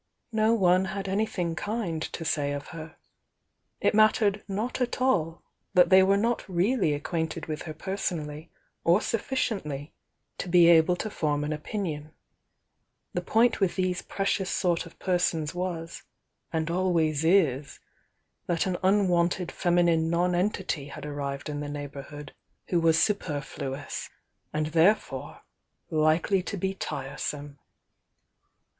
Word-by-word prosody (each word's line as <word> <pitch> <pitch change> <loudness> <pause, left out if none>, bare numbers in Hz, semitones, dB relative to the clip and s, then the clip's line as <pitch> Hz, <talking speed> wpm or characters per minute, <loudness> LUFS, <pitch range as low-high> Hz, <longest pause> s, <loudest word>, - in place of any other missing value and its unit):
No 220 +1 +3
one 185 -2 +4
had 195 +1 -4
anything 190 -4 -1
kind 205 -5 -3
to 165 - -5
say 145 -2 0
of 145 0 -6
her. 160 -1 -9 0.8
It - - +2
mattered 210 -1 +4
not 215 +6 -3
at 245 0 -1
all 170 -11 +1 0.3
that 180 +1 +6
they 190 0 +8
were 195 +1 +4
not 230 +3 0
really 185 - +2
acquainted 160 +1 -3
with 155 -1 -4
her - - -4
per 190 +4 -4
sonally 155 -4 -4 0.3
or 175 +4 +5
sufficiently 200 - -2 0.5
to - - -4
be 175 -1 +6
able 170 +1 +6
to 215 +4 -4
form 150 -4 0
an 150 +1 -1
opinion, 155 -2 -4 1.0
—«ie - - 0
point 230 +2 +3
with 190 -4 +1
these 185 -1 0
precious 195 -1 -1
sort 175 -3 0
of 165 - -16
persons 175 -4 0
was 175 -2 -4 0.5
and 160 0 -1
always 165 -4 +1
IS, 160 -6 +2 0.7
that 170 -2 +1
an 185 -2 -1
unwanted 180 -2 +2
feminine 170 -2 +2
nonen 180 +3 +2
tity 160 -8 -4
had 145 - -8
arrived 140 -1 -4
m 145 -1 -4
the 145 0 -4
neighbourhood 145 0 -7 0.4
who 175 - +2
was 165 -1 +4
su 185 +6 +4
perfluous, 140 -5 -5 0.4
and 155 0 -1
therefore 175 +6 +1 0.5
likely 160 +5 +2
to 200 - -5
be 190 +1 -1
tiresome. 145 -3 -5
170 Hz, 140 wpm, -27 LUFS, 155-195 Hz, 1.0 s, they